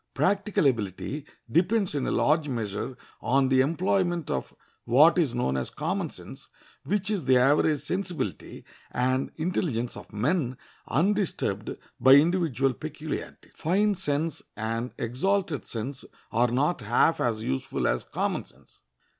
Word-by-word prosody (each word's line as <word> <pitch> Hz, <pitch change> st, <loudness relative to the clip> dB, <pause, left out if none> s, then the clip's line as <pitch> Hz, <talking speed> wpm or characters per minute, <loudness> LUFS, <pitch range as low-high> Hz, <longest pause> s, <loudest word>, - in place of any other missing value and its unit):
Practical 200 Hz, -2 st, +1 dB
ability 130 Hz, -, -1 dB, 0.2 s
depends 190 Hz, +3 st, +2 dB
in 140 Hz, -3 st, -1 dB
a -, -, 0 dB
large 150 Hz, 0 st, +2 dB
measure 115 Hz, +1 st, -3 dB, 0.2 s
on 135 Hz, +1 st, +2 dB
the 130 Hz, 0 st, +5 dB
employment 175 Hz, +2 st, 0 dB
of 65 Hz, -, -2 dB, 0.3 s
what 150 Hz, +9 st, +5 dB
is 140 Hz, -8 st, +1 dB
known 65 Hz, -, 0 dB
as 65 Hz, -1 st, -2 dB
common -, -, -2 dB
sense, -, -, -12 dB, 0.4 s
which 205 Hz, +1 st, -1 dB
is 200 Hz, -5 st, -1 dB
the 130 Hz, -1 st, +5 dB
average 145 Hz, +3 st, +3 dB
sensibility 180 Hz, +2 st, -4 dB, 0.2 s
and 130 Hz, +2 st, 0 dB
intelligence 155 Hz, -, -1 dB
of -, -, -11 dB
men 125 Hz, -, 0 dB, 0.3 s
undisturbed 195 Hz, +5 st, 0 dB, 0.2 s
by 130 Hz, -, +7 dB
individual 145 Hz, -4 st, +3 dB
peculiarities. 155 Hz, +2 st, -6 dB
Fine 205 Hz, +6 st, +2 dB
sense 160 Hz, -4 st, -2 dB, 0.2 s
and 115 Hz, +3 st, -2 dB
exalted 155 Hz, -, -1 dB
sense 125 Hz, +4 st, -5 dB, 0.3 s
are 120 Hz, +2 st, +3 dB
not 140 Hz, +6 st, +1 dB
half 120 Hz, +9 st, +3 dB
as 110 Hz, -2 st, 0 dB
useful 65 Hz, -7 st, -1 dB
as -, -, 0 dB
common -, -, -2 dB
sense. -, -, -24 dB
145 Hz, 135 wpm, -27 LUFS, 125-175 Hz, 0.4 s, by